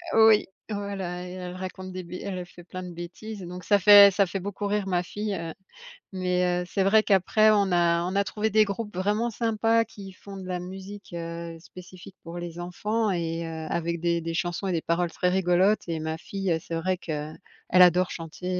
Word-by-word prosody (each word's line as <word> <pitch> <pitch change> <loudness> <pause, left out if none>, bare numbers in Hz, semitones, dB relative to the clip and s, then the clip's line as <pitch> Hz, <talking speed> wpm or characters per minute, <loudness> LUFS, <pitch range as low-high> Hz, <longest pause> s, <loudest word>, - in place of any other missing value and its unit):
oui, 220 -1 +6 0.2
voilà, 195 -4 -4
elle 180 +1 -7
elle 180 0 -6
raconte 185 0 -7
des 185 0 -6
b 170 0 -11
elle 195 -2 -4
a 180 - -5
fait 175 0 -15
plein 185 +1 -7
de 180 - -7
bêtises. 185 +5 -8
Donc 180 0 -8
ça 205 +4 +3
fait 200 +1 +9
ça 200 0 +3
fait 195 +2 -3
beaucoup 200 +2 -4
rire 205 -1 0
ma 180 -2 +1
fille, 205 +3 -4
heu, 165 -3 -4 0.6
mais 180 -1 0
heu, - - -5
c'est 195 +1 0
vrai 215 +3 +5
qu'après, 215 +2 +4
on 200 -2 +3
a 170 -1 +3
on 185 +2 -3
a 200 - +3
trouvé 215 +2 -1
des 215 0 +4
groupes 205 -1 -5
vraiment 210 +5 0
sympas 225 0 +1
qui 200 -3 -11
font 195 +1 -11
de 190 - -8
la 180 -1 -2
musique, 190 +3 -9
heu, 170 0 -6
spécifique 185 +2 -13
pour 170 +1 -7
les 175 -1 -7
enfants 210 +5 -1
et 165 -2 -2
heu, 160 -1 -6
avec 170 0 -2
des 170 0 0
des 165 0 -3
chansons 175 +2 -2
et - - 0
des 165 - 0
paroles 170 +1 0
très 180 - 0
rigolotes. 185 +3 +3
Et 165 -2 -3
ma 160 0 -3
fille, 195 +3 -4
heu, 165 - +2
c'est 165 - -3
vrai 185 +3 0
qu'elle 155 -2 -5 0.3
adore 180 0 +5
chanter 165 +2 -7
185 Hz, 215 wpm, -26 LUFS, 175-200 Hz, 0.6 s, fait